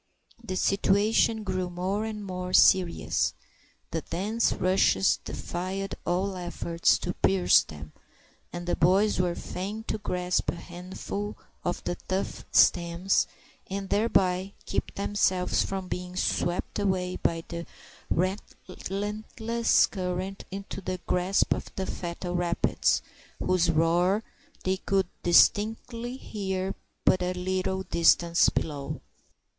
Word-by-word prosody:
The 190 -5 -4
situation 210 +3 +2
grew 185 -2 -2
more 185 +4 -2
and 210 -2 -5
more 180 -1 -4
serious. 185 -3 +4 0.6
The 165 - -1
dense 210 +9 0
rushes 190 +1 +3
defied 190 +3 -4
all 185 +3 0
efforts 175 -1 +1
to - - -3
pierce 90 0 +4
them, 75 0 -10 0.6
and 175 0 -6
the 175 - 0
boys 190 +6 +3
were 175 -1 +1
fain 205 +4 -5
to 215 - -3
grasp 180 -2 -1
a - - -2
handful 185 +4 -6 0.3
of 175 - -2
the 175 - -2
tough 190 +1 -2
stems, 175 +2 +4 0.4
and 195 0 -4
thereby 195 -3 +2
keep - - -2
themselves 195 -2 +1
from 190 -1 -4
being 180 0 -5
swept 175 +1 -1
away 185 -2 0
by 165 0 0
the 170 0 -6 0.4
relentless 210 +4 0
current 185 0 -4
into 195 0 -6
the 185 0 -3
grasp 180 +2 +2
of - - -6
the 190 - -2
fatal 175 0 -4
rapids, 175 -1 +1 0.3
whose 180 -2 +2
roar 175 +6 +3 0.4
they 190 0 +1
could 195 0 +1 0.2
distinctly 230 +6 +3
hear 190 -5 -3 0.3
but 185 - +4
a 180 0 0
little 185 +1 -1
distance 170 -1 +4
below. 145 -3 -3
185 Hz, 120 wpm, -28 LUFS, 175-200 Hz, 0.6 s, serious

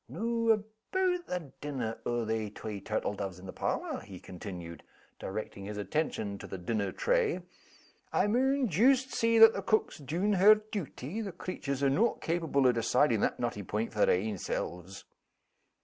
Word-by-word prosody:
"Noo 230 0 -1
aboot 285 - -1
the 170 -7 -4
dinner 130 -6 -3
o' 120 -1 0
they 110 -1 -1
twa 105 0 -6
turtle 105 0 -2
doves 95 -3 -5
in 90 - -12
the 95 - -7
parlor?" - - -2
he 95 -4 -10
continued, 90 -2 -8 0.4
directing 100 0 -5
his 105 +1 -5
attention 105 - -2
to - - -8
the 95 - -6
dinner 100 +2 -1
tray. - - +1 0.7
"I - - +2
maun 260 +5 +2
joost 255 - +3
see 230 -1 +2
that 225 0 +9
the - - -3
cook's 220 - +1
's - - -17
dune 170 +9 0
her 200 +3 +8
duty 210 - -5
the 200 -3 -4
creatures 140 -6 -4
are 140 - +5
no' 225 +12 +3
capable 160 -5 0
o' 125 - +7
decidin' 120 0 +2
that - - 0
knotty 120 -4 -2
point 105 +4 -3
for 105 - +3
their - - +5
ain 105 -1 -3
selves." 90 +4 -4
140 Hz, 175 wpm, -31 LUFS, -, 0.7 s, that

